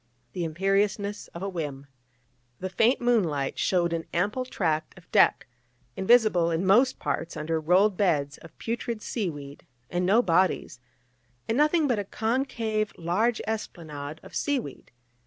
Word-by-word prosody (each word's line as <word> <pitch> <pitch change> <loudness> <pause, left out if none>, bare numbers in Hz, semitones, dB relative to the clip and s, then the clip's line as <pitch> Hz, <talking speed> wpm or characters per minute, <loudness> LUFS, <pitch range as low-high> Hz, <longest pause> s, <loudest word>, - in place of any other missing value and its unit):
the 175 - -3
imperiousness 195 +5 0
of 170 - -9
a - - -1
whim. 150 -7 -5 0.7
The 185 0 -4
faint 230 +8 +3
moonlight 175 - +1
shewed 175 -2 +1
an 165 -1 -2
ample 210 +9 0
tract 160 -8 -2
of 180 - -18
deck, - - +4 0.5
invisible 190 -5 +4
in 170 +3 -1
most 240 +7 +4
parts 165 - -3
under 160 +1 -1
rolled 185 +5 +3
beds 145 -8 +1
of 165 - -15
putrid 230 -1 -4
seaweed, 145 - -5 0.3
and 175 0 0
no 210 +7 +4
bodies, 180 - +1 0.7
and 225 - 0
nothing 300 +2 +3
but 240 -5 +1
a - - -1
concave, 220 -1 -1
large 200 +8 0
esplanade 155 -8 -5
of - - -13
seaweed. 265 - -3
190 Hz, 140 wpm, -27 LUFS, 165-220 Hz, 0.7 s, deck